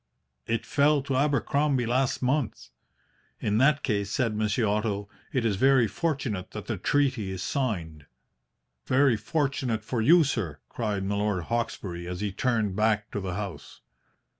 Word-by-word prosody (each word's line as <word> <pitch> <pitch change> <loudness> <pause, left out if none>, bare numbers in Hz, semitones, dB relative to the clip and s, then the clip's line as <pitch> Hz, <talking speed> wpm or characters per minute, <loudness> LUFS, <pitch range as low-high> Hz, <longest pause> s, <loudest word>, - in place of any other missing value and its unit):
It 115 -1 -1
fell 145 0 +3
to 135 -1 -2
Abercrombie 140 -1 +1
last 130 +3 0
month.' 130 0 -1 0.7
"'In 105 +1 +1
that 140 +2 +4
case,' 100 -5 0
said 115 +1 0
Monsieur 110 +2 +1
Otto, 105 -1 -1 0.2
'it 130 -3 0
is 105 -4 +1
very 130 0 +4
fortunate 120 - -2
that - - -6
the - - -3
treaty 130 -8 +1
is 95 -1 -4
signed.' 85 - -3 0.8
"'Very 135 -1 +4
fortunate 125 -1 -1
for 115 +1 -2
you, 165 +8 +6
sir,' 105 - -2
cried 105 -4 -2
Milord 100 -2 0
Hawkesbury, 95 -6 -3
as 90 0 -4
he 105 -1 -1
turned 110 -2 0
back 105 0 +1
to - - -3
the 95 -2 -4
house. 90 -9 -7
110 Hz, 150 wpm, -27 LUFS, 100-135 Hz, 0.8 s, you